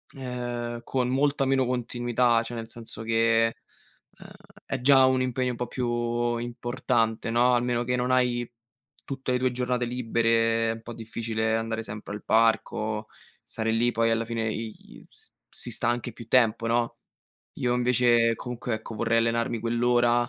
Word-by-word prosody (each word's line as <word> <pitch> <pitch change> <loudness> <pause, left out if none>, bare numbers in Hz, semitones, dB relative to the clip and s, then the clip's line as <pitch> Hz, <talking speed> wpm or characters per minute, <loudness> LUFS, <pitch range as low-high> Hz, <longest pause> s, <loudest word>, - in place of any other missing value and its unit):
ehm, 120 -2 -4
con 125 -1 -1
molta 140 +1 +1
meno 130 -1 +2
continuità, 120 -1 +1
cioè 115 - -6
nel 115 -1 -6
senso 115 -1 -6
che, 115 0 +2 0.7
uhm, - - -12 0.4
è - - -3
già 135 0 +6
un 130 0 +3
impegno 130 0 0
un 120 - -6
po' 125 - -3
più 120 -1 -1
importante, 120 -1 -1
no, 120 +2 +4
almeno 120 0 0
che 125 0 0
non 125 +1 0
hai 120 -2 +2 0.6
tutte 135 -2 -4
le 125 - +1
tue 130 0 +1
giornate 125 0 -1
libere, 115 -1 +1
è - - 0
un 115 - -10
po' 120 - -7
difficile 110 0 -2
andare 115 0 -2
sempre 105 -1 -7
al 105 - -7
parco, 110 -1 +1 0.4
stare 110 0 -2
lì 120 +2 +2
poi 115 0 +1
alla 115 0 +1
fine 115 -1 -2
i 110 0 -8
s - - -10 0.2
si 120 - -2
sta 120 +2 +1
anche 120 -1 -2
più 115 0 -11
tempo, 115 -2 +3
no; 120 0 0 0.6
io 125 -1 0
invece 120 -2 +3
comunque, 125 -1 -4
ecco, 110 +1 -7
vorrei 115 +1 +1
allenarmi 115 0 0
quell'ora 120 +1 +2
120 Hz, 165 wpm, -26 LUFS, 115-125 Hz, 0.7 s, già